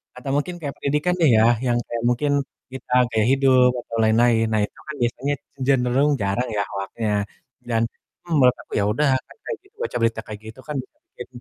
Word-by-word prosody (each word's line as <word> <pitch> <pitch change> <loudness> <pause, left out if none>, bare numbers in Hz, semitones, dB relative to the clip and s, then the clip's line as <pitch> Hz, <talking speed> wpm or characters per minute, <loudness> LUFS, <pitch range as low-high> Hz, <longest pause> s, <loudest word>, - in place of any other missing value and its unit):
atau 125 +2 -7
mungkin 160 +5 -1
kayak 145 -4 -4
pendidikan 150 +5 0
nih 160 -4 +5
ya, - - +5 0.2
yang 120 -1 +2
kayak 115 -1 -4
mungkin 135 +4 +1 0.4
kita 130 -1 -10 0.2
gaya 110 -1 +2
hidup 130 -2 +5
atau 115 - -8
lain-lain. 115 +1 +4
Nah 110 - +2
itu - - -19
kan 155 - -5
biasanya 130 +4 0 0.3
cenderung 135 +1 +3
jarang 100 +6 0
ya - - +2
hoaknya. 105 +2 -3 0.6
Dan, 115 -1 +1 0.4
mmm, 170 - -4
menurut 125 -1 +5
aku, - - -23
ya 100 - +2
udah 150 +7 +1 0.2
kan - - -17
kayak 475 - -4
gitu, 390 +2 -27
baca - - -3
berita 115 -1 +1
kayak 105 -1 -8
gitu 115 - -13
kan 150 - -4
bisa 130 - -22 0.2
bikin 125 - -9
125 Hz, 200 wpm, -22 LUFS, 115-145 Hz, 0.6 s, nih